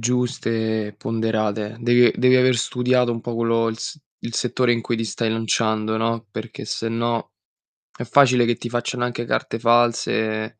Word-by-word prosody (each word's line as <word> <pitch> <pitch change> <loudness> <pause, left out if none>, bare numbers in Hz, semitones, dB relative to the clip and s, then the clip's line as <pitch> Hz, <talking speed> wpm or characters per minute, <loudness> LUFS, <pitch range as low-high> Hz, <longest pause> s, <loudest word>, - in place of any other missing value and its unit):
giuste, 115 -3 -1
ponderate. 110 -1 -2
Devi 120 0 +5
devi 125 0 +4
aver 130 -1 +4
studiato 125 0 +1
un 115 - -4
po' 120 0 -5
quello 115 0 +1
il 110 0 -4
s 155 - -5 0.3
il 115 - -5
settore 125 0 +1
in 115 - 0
cui 115 +1 -2
ti 115 - -2
stai 110 +1 -2
lanciando, 110 -1 0
no, 115 0 -1
perché 110 +1 -7
se 115 +1 -3
no 115 0 -2 0.7
è - - -4
facile 125 -1 +4
che 120 0 +1
ti 120 - -7
facciano 120 +1 -2
anche 120 -1 -3
carte 115 - -2
false, 115 -2 +1
115 Hz, 170 wpm, -22 LUFS, 110-120 Hz, 0.7 s, Devi